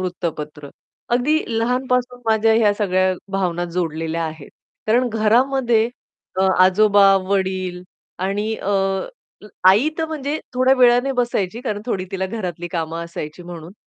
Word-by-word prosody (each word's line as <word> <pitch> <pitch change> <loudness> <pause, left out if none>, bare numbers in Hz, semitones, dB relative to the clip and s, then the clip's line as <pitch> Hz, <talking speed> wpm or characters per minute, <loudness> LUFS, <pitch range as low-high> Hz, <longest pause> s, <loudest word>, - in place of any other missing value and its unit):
वृत्तपत्र. 155 -5 -5 0.4
अगदी 265 +7 +2 0.2
लहानपासून 250 +1 0
माझ्या 220 0 +3
ह्या 220 -2 +4
सगळ्या 185 -2 +1 0.2
भावना 175 -3 -1
जोडलेल्या 165 -1 -2
आहेत. 155 -2 -7 0.4
कारण 245 +3 +2
घरामध्ये 235 +1 +2 0.5
अ, - - +3 0.2
आजोबा, 200 +1 +5
वडील 190 -2 -1 0.4
आणि 205 +4 -1
अ, - - -6 1.0
आई 210 +10 +5
तर 320 - +1
म्हणजे 305 -1 -3 0.2
थोड्या 255 +1 +4
वेळाने 250 +1 +4
बसायची, 235 -4 -1
कारण 210 -5 -4
थोडी 190 -6 -2
तिला 190 0 -2
घरातली 180 -5 -5
कामं 165 -1 -3
असायची 170 0 -7
म्हणून, 170 -1 -9
205 Hz, 125 wpm, -20 LUFS, 180-245 Hz, 1.0 s, आजोबा